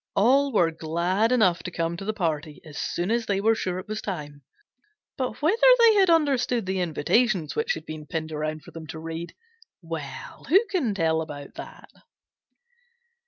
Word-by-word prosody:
All 275 +7 +4
were 175 -8 +3
glad 170 +7 0
enough 190 -9 +3
to - - -5
come 170 -1 -2
to 195 - -7
the 215 - 0
party 160 -6 -3
as 155 -2 -11
soon 175 +6 -2
as 235 -1 0
they 195 -1 +1
were 220 +3 +3
sure 185 -5 -2
it 185 - -7
was 215 0 -4
time, 145 -7 -6 0.7
but 260 +1 -4
whether 440 +10 +2 0.2
they 465 -2 +7
had 390 -3 +4
understood 275 - +2
the 190 0 -1
invitations 180 +3 +1
which 460 +2 0
had - - -9
been 155 -1 -8
pinned 160 -2 -4
around 155 0 -3
for - - -13
them 160 -1 -9
to 160 +2 -7
read 165 +1 -6 0.4
well, 165 -6 -7
who 390 +9 +5
can 270 - 0
tell 160 -3 +1
about 145 -3 -8
that? - - -11
180 Hz, 180 wpm, -25 LUFS, 160-240 Hz, 0.7 s, they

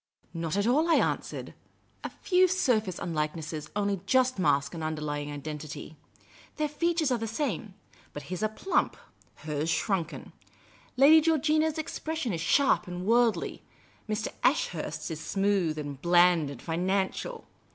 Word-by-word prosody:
" - - -35
Not 165 +1 -2
at 205 - +1
all," 300 +8 +3
I 330 - +6
an.swered. - - -1 0.3
" - - -38
A - - -3
few 370 0 +2
surface 235 - +1
unlikenesses 155 -1 -3
only 200 -2 0
just 255 -1 +3
mask 140 -4 +2
an 165 - -6
underlying 150 -2 -3
identity. 150 +1 -7 0.6
Their 305 -1 -1
features 325 -1 0
are 245 - +1
the 225 - -3
same; 220 - -3 0.4
but 145 - -7
his 180 +6 -5
are 215 - +1
plump; 370 - 0 0.5
hers, 150 +1 -2
shrunken. 170 -2 -2 0.6
Lad}' 300 +4 +7
Georgina's 315 0 +2
expression 315 -5 -3
is 165 - -3
sharp 275 - +3
and 180 0 -5
worldly; 235 +1 +2 0.5
Mr. 215 0 -1
Ashurst's 165 - 0
is 155 - -4
smooth, 195 -2 0
and 145 -2 -6
bland, 175 -3 +4
and 140 -4 -9
financial. 190 - -2
190 Hz, 145 wpm, -28 LUFS, -, 0.6 s, Lad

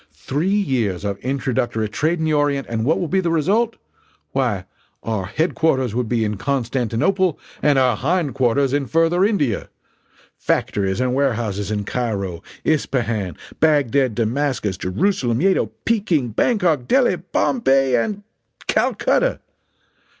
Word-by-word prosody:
Three 140 - -2
years 125 - 0
of 100 -1 -2
introductory 120 -4 -1
trade 155 +11 0
in 160 - -1
the 155 - +1
orient 145 -2 +1
and 115 -1 -2
what 155 +7 +2
will 175 - -1
be 190 +4 +1
the 175 -2 0
result? 200 +9 +1 0.6
Why, 120 -9 -1 0.4
our 105 -5 -2
headquarters 135 - 0
would 120 -1 -1
be 115 -2 +1
in 105 -1 -2
Constantinople 135 - 0 0.2
and 145 -2 +3
our 130 -3 +3
hindquarters 140 - +1
in 140 -2 0
Further 165 +5 +2
India! 165 - 0 0.7
Factories 95 +1 0
and 125 0 +1
warehouses 115 -7 -1
in 105 -1 -1
Cairo, 100 -7 -3 0.2
Ispahan, 115 - 0 0.2
Bagdad, 140 -6 +2
Damascus, 120 -3 -1
Jerusalem, 120 - 0
Yedo, 190 +4 +2 0.2
Peking, 180 - +1
Bangkok, 160 - +1
Delhi, 265 -2 +3
Bombay 135 - +1
and 200 - -1 0.4
Calcutta! - - +1
135 Hz, 130 wpm, -21 LUFS, 115-160 Hz, 0.7 s, and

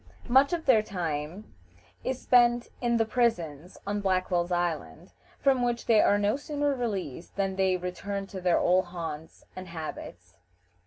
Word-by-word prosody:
Much 265 +3 +5
of 340 -2 -2
their 245 -5 +5
time 175 -1 -5 0.5
is 260 -1 -2
spent 240 -1 +3
in 235 -1 +2
the 225 - +2
prisons 180 - -1
on 205 +1 -2
Blackwell's 185 -2 0
Island, 175 0 -2 0.3
from 270 -2 +3
which 240 -1 -1
they 220 -2 +5
are 205 - +4
no 205 +2 +1
sooner 290 0 -1
released 195 - -4
than 195 -1 -1
they 190 -1 +2
return 195 +2 -4
to 195 -1 -8
their 180 -1 +3
old 185 +1 +3
haunts 165 -3 -7
and 185 0 -8
habits. 90 - -8
195 Hz, 155 wpm, -28 LUFS, 175-240 Hz, 0.5 s, Much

